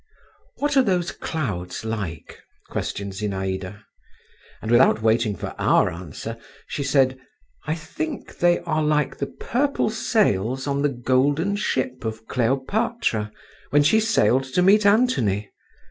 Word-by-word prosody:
"What 290 Hz, 0 st, 0 dB
are 270 Hz, -, +7 dB
those 180 Hz, -7 st, 0 dB
clouds 105 Hz, -, -4 dB
like?" 100 Hz, -9 st, -5 dB, 0.3 s
questioned 100 Hz, 0 st, -3 dB
Zinaïda; 95 Hz, 0 st, -4 dB, 0.8 s
and 110 Hz, -, -4 dB
without 120 Hz, -2 st, +5 dB
waiting 110 Hz, -2 st, +2 dB
for -, -, -6 dB
our -, -, +3 dB
answer, 90 Hz, +7 st, -7 dB, 0.3 s
she -, -, -4 dB
said, 135 Hz, -2 st, +2 dB, 0.5 s
"I 155 Hz, -, 0 dB
think 285 Hz, -, -6 dB
they 175 Hz, 0 st, +3 dB
are 155 Hz, -, -1 dB
like 150 Hz, -1 st, +1 dB
the 140 Hz, -, -1 dB
purple 270 Hz, -, -1 dB
sails 130 Hz, -, +1 dB
on 140 Hz, 0 st, -1 dB
the 145 Hz, -, +2 dB
golden 140 Hz, +9 st, +1 dB
ship 130 Hz, -, -2 dB
of 110 Hz, 0 st, -5 dB
Cleopatra, 130 Hz, -, 0 dB, 0.4 s
when 145 Hz, +1 st, +4 dB
she 190 Hz, +10 st, +4 dB
sailed 215 Hz, -, +2 dB
to 135 Hz, +7 st, +1 dB
meet 205 Hz, +2 st, +5 dB
Antony. 125 Hz, -, +2 dB
130 Hz, 130 wpm, -23 LUFS, 110-180 Hz, 0.8 s, are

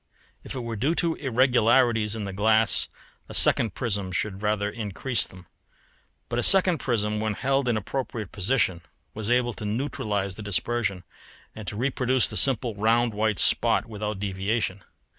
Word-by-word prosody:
If -, -, -8 dB
it 130 Hz, -, -3 dB
were 115 Hz, -1 st, -5 dB
due 140 Hz, +10 st, 0 dB
to 170 Hz, -1 st, +1 dB
irregularities 120 Hz, -4 st, +2 dB
in 110 Hz, -2 st, -4 dB
the 100 Hz, -, -5 dB
glass 110 Hz, 0 st, +2 dB, 0.4 s
a -, -, -6 dB
second 110 Hz, -5 st, +3 dB
prism 100 Hz, -6 st, -2 dB
should 95 Hz, +2 st, -3 dB
rather 105 Hz, -1 st, 0 dB
increase 110 Hz, +3 st, -2 dB
them, 90 Hz, -1 st, -15 dB, 0.8 s
but 120 Hz, 0 st, -2 dB
a -, -, +2 dB
second 185 Hz, 0 st, +5 dB
prism 105 Hz, -3 st, -1 dB
when 110 Hz, -1 st, -1 dB
held 135 Hz, +2 st, 0 dB
in 120 Hz, -2 st, +1 dB
appropriate 110 Hz, -2 st, -4 dB
position 100 Hz, -4 st, 0 dB, 0.3 s
was 110 Hz, 0 st, -4 dB
able 120 Hz, 0 st, +2 dB
to -, -, -7 dB
neutralise 105 Hz, -4 st, -2 dB
the 110 Hz, -, -9 dB
dispersion 100 Hz, -1 st, -1 dB, 0.5 s
and 110 Hz, -3 st, -9 dB
to 95 Hz, -, -4 dB
reproduce 130 Hz, +1 st, +1 dB
the -, -, -6 dB
simple 125 Hz, -3 st, +2 dB
round 115 Hz, +3 st, +1 dB
white 110 Hz, -1 st, 0 dB
spot -, -, +3 dB
without 105 Hz, -1 st, -5 dB
deviation. 100 Hz, +1 st, -2 dB
110 Hz, 160 wpm, -25 LUFS, 105-120 Hz, 0.8 s, second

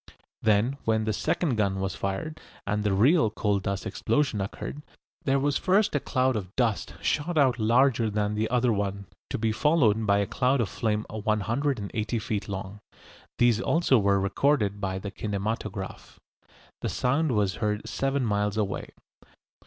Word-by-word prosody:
Then 110 Hz, +6 st, +2 dB
when 110 Hz, -1 st, +1 dB
the 110 Hz, 0 st, 0 dB
second 130 Hz, -, 0 dB
gun 100 Hz, -2 st, +1 dB
was 95 Hz, -1 st, -2 dB
fired, 100 Hz, +14 st, -4 dB, 0.2 s
and 105 Hz, +1 st, -1 dB
the 105 Hz, -, +1 dB
real 115 Hz, -, +4 dB
coal 105 Hz, -2 st, 0 dB
dust 100 Hz, 0 st, -3 dB
explosion 135 Hz, -8 st, 0 dB
occurred, 100 Hz, +8 st, -5 dB, 0.4 s
there 135 Hz, 0 st, +3 dB
was 140 Hz, +1 st, +1 dB
first 195 Hz, +3 st, +2 dB
a 145 Hz, -, +2 dB
cloud 130 Hz, -1 st, +1 dB
of 95 Hz, -3 st, -5 dB
dust 115 Hz, -5 st, 0 dB
shot 160 Hz, +3 st, 0 dB
out 130 Hz, -4 st, +3 dB
larger 115 Hz, +1 st, +3 dB
than 105 Hz, 0 st, -1 dB
the 110 Hz, +1 st, -1 dB
other 125 Hz, -1 st, +2 dB
one, 100 Hz, -1 st, -2 dB, 0.2 s
to -, -, -2 dB
be 110 Hz, 0 st, 0 dB
followed 115 Hz, -5 st, +2 dB
by 100 Hz, 0 st, +4 dB
a 100 Hz, -, +1 dB
cloud 130 Hz, +5 st, +1 dB
of 115 Hz, -, 0 dB
flame 110 Hz, -2 st, -1 dB
180 110 Hz, +1 st, -1 dB
feet 105 Hz, -2 st, -3 dB
long. 95 Hz, +1 st, -5 dB, 0.6 s
These 120 Hz, -2 st, +3 dB
also 160 Hz, -6 st, +3 dB
were 100 Hz, -1 st, +3 dB
recorded 105 Hz, 0 st, +1 dB
by 95 Hz, -2 st, -2 dB
the 100 Hz, +1 st, -6 dB
kinematograph. 100 Hz, -1 st, -4 dB, 0.6 s
The -, -, -1 dB
sound 140 Hz, +3 st, +1 dB
was 100 Hz, -4 st, +1 dB
heard 105 Hz, 0 st, -1 dB
seven 135 Hz, -1 st, -1 dB
miles 105 Hz, -1 st, 0 dB
away. 100 Hz, -2 st, -2 dB
110 Hz, 160 wpm, -27 LUFS, 100-130 Hz, 0.6 s, real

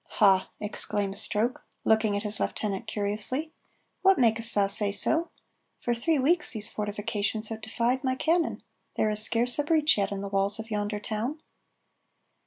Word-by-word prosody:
"Ha!" 195 Hz, -3 st, +3 dB
exclaims 205 Hz, -1 st, -3 dB
Stroke, 225 Hz, +4 st, -2 dB, 0.2 s
looking 220 Hz, -2 st, +2 dB
at 205 Hz, -, -5 dB
his 210 Hz, 0 st, -1 dB
lieutenant 210 Hz, +2 st, -4 dB
curiously, 220 Hz, +10 st, +3 dB, 0.5 s
"what 385 Hz, 0 st, +4 dB
makest 230 Hz, -2 st, +2 dB
thou 200 Hz, -1 st, +3 dB
say 200 Hz, +1 st, +3 dB
so? 320 Hz, +11 st, +1 dB, 0.5 s
For 240 Hz, -, -2 dB
three 295 Hz, +7 st, 0 dB
weeks 305 Hz, +4 st, +2 dB
these 215 Hz, -2 st, -4 dB
fortifications 210 Hz, +1 st, -3 dB
have 220 Hz, -1 st, -7 dB
defied 235 Hz, +4 st, -2 dB
my 260 Hz, -1 st, -1 dB
cannon, 330 Hz, +4 st, -1 dB, 0.3 s
there 215 Hz, -, 0 dB
is 210 Hz, 0 st, +7 dB
scarce 235 Hz, +4 st, +3 dB
a -, -, +2 dB
breach 305 Hz, -5 st, +2 dB
yet 200 Hz, -, -1 dB
in 200 Hz, -1 st, -4 dB
the 200 Hz, -, -5 dB
walls 195 Hz, +1 st, 0 dB
of 220 Hz, 0 st, -8 dB
yonder 210 Hz, 0 st, -3 dB
town." 225 Hz, +8 st, -5 dB
220 Hz, 165 wpm, -26 LUFS, 205-255 Hz, 0.5 s, is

